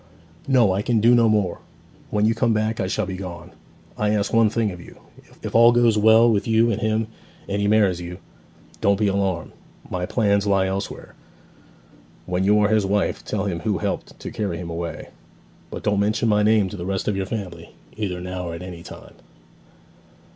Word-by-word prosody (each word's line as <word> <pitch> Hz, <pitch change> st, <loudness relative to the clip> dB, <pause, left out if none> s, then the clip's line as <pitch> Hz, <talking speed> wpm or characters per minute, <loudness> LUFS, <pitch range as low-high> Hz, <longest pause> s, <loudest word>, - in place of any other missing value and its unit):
'No; 125 Hz, -7 st, +4 dB
I 95 Hz, +2 st, 0 dB
can 115 Hz, +1 st, +1 dB
do 115 Hz, +3 st, +5 dB
no 115 Hz, -2 st, +5 dB
more. 105 Hz, -5 st, 0 dB, 0.5 s
When 105 Hz, 0 st, +1 dB
you 110 Hz, -, +3 dB
come 115 Hz, -1 st, +1 dB
back 110 Hz, +1 st, -1 dB
I 95 Hz, -, -1 dB
shall -, -, -1 dB
be 95 Hz, -, -5 dB
gone. 90 Hz, -3 st, -8 dB, 0.5 s
I 105 Hz, -, +1 dB
ask 105 Hz, -1 st, 0 dB
one 115 Hz, -1 st, +5 dB
thing 110 Hz, -1 st, 0 dB
of 90 Hz, -1 st, -9 dB
you. -, -, -14 dB, 0.5 s
If -, -, -5 dB
all 115 Hz, +1 st, +7 dB
goes 120 Hz, -2 st, +3 dB
well 110 Hz, +2 st, +6 dB
with 105 Hz, -4 st, +1 dB
you 115 Hz, +1 st, +3 dB
and 105 Hz, -, -2 dB
him, 110 Hz, +1 st, 0 dB, 0.4 s
and 100 Hz, +1 st, -2 dB
he 100 Hz, -, +1 dB
marries 100 Hz, -4 st, +3 dB
you 90 Hz, +1 st, -7 dB, 0.6 s
don't 100 Hz, 0 st, +3 dB
be 105 Hz, -, 0 dB
alarmed; 95 Hz, -4 st, -1 dB, 0.4 s
my 90 Hz, 0 st, -2 dB
plans 100 Hz, -3 st, +1 dB
lie 100 Hz, -1 st, +3 dB
elsewhere 95 Hz, +1 st, -5 dB, 1.1 s
when 90 Hz, +1 st, -1 dB
you 105 Hz, +2 st, +4 dB
are 105 Hz, -, +3 dB
his 110 Hz, -1 st, +3 dB
wife 100 Hz, +1 st, -1 dB
tell 105 Hz, -1 st, -3 dB
him 90 Hz, -4 st, -2 dB
who 105 Hz, -1 st, -1 dB
helped -, -, -4 dB
to -, -, -6 dB
carry 100 Hz, -6 st, -3 dB
him 85 Hz, -1 st, -6 dB
away. 85 Hz, -1 st, -5 dB, 0.6 s
But -, -, -7 dB
don't 105 Hz, -1 st, +1 dB
mention 110 Hz, +3 st, +1 dB
my 105 Hz, -1 st, +3 dB
name 105 Hz, -1 st, +3 dB
to 105 Hz, -, -8 dB
the 85 Hz, -, -5 dB
rest 95 Hz, -1 st, -2 dB
of 105 Hz, -, +1 dB
your 95 Hz, -1 st, -2 dB
family, 90 Hz, -7 st, -7 dB, 0.2 s
either 95 Hz, -4 st, -3 dB
now 90 Hz, -1 st, -5 dB
or 85 Hz, -, -5 dB
at 85 Hz, -, -8 dB
any 90 Hz, -2 st, -8 dB
time.' -, -, -12 dB
100 Hz, 205 wpm, -22 LUFS, 95-110 Hz, 1.1 s, all